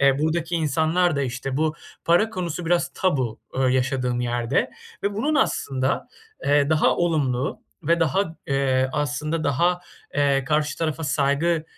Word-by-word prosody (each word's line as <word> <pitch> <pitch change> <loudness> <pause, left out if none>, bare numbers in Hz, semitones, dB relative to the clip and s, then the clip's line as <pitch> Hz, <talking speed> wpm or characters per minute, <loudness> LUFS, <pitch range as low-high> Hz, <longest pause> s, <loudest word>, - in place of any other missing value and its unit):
eee, 140 0 +4
buradaki 160 +2 0
insanlar 160 +2 +2
da 140 - +1
işte 130 +1 -3
bu 155 0 +1 0.3
para 175 +7 +3
konusu 175 -4 -4
biraz 170 -1 +2
tabu, 130 - 0
eee, 130 - -1
yaşadığım 125 -1 0
yerde 120 +1 0 0.3
ve 200 0 -1
bunun 285 +9 0
aslında, 135 - 0 0.4
eee, 145 +1 +3
daha 155 -1 +3
olumlu 140 -7 0 0.2
ve 170 +2 +2
daha, 165 +2 +1
eee, 135 -1 +1
aslında 150 +2 -1
daha, 175 +6 +2 0.3
eee, 140 -2 +2
karşı 150 +1 0
tarafa 160 -1 -2
saygı, 145 +4 +1
150 Hz, 145 wpm, -24 LUFS, 135-170 Hz, 0.4 s, eee